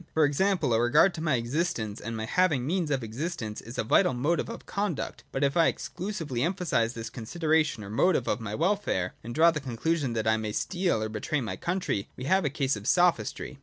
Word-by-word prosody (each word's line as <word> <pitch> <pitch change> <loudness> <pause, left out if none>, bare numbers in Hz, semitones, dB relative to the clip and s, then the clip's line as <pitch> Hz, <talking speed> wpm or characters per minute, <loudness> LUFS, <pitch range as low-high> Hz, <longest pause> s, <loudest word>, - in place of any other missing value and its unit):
For 160 -1 +5
example, 180 -1 +1
a 115 - +3
regard 150 +10 +5
to 160 - -6
my 155 -4 +2
existence, 120 -4 -2
and 115 +1 -4
my 110 - -3
having 160 0 +2
the - - -4
means 180 -5 0
of 135 -4 0
existence, 115 -2 -4
is 115 +2 -9
a - - +1
vital 120 +3 +3
motive 150 - 0
of 230 - -8
conduct, 200 -5 -3
but 135 - -1
if 140 0 +2
I 165 -1 +5
exclusively 170 - -3
emphasise 165 -9 0
this 115 -1 -6
consideration 155 0 0
or 100 - -8
motive 130 +2 +2
of - - 0
my 105 -1 -4
welfare, 165 - 0
and 120 +2 -6
draw 165 +2 +6
the 155 - -3
conclusion 135 +2 -1
that 110 -1 -1
I 110 0 +4
may 110 -1 -3
steal 175 - 0
or 110 - -2
betray 110 +8 -2
my 110 -7 -3
country, 170 - -2
we 130 - -6
have 190 +6 +2
a - - +2
case 135 -1 0
of 105 0 -7
Sophistry. 175 -5 +1
140 Hz, 220 wpm, -28 LUFS, 115-170 Hz, -, draw